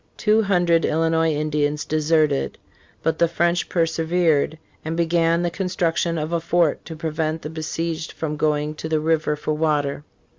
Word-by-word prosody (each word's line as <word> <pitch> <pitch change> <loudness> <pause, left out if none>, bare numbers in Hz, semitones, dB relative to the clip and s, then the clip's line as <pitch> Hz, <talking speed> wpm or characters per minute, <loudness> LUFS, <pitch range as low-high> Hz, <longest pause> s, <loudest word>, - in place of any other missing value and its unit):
Two 215 0 +3
hundred 175 -5 +2
Illinois 160 0 +2
Indians 150 -1 -1
deserted. 155 -2 +1 0.5
But 160 -1 0
the 170 - +4
French 170 +1 0
persevered, 165 -2 +1 0.3
and 160 +1 -3
began 170 0 +2
the 175 - 0
construction 170 -2 -1
of 155 +2 -3
a 170 - +2
fort 165 -2 +1
to 160 - -7
prevent 155 0 -2
the 150 - -5
besieged 160 +1 -3
from 155 -2 -4
going 150 0 0
to 160 - -5
the 155 -1 +1
river 155 -1 +1
for 150 +1 -2
water. 150 -2 0
160 Hz, 155 wpm, -22 LUFS, 155-170 Hz, 0.5 s, the